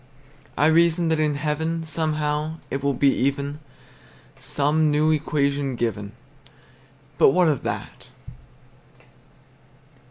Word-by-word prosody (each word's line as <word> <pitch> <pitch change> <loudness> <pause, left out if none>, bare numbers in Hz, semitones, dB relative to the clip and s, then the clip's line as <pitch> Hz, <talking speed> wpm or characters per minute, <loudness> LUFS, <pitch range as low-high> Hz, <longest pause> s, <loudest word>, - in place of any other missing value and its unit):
I 150 - +3
reason 170 +1 +3
that 160 -1 +1
in 150 -1 +1
heaven 160 +3 -2
Somehow, 155 -1 -2 0.2
it 135 - -2
will 140 -1 0
be 140 +2 +3
even, 140 +2 -2 0.8
Some 150 +2 +1
new 150 +1 +2
equation 140 -3 0
given; 105 -4 -3 1.1
But - - +7
what 180 +1 +4
of 145 -5 +1
that? - - -6
150 Hz, 105 wpm, -23 LUFS, 140-160 Hz, 1.1 s, But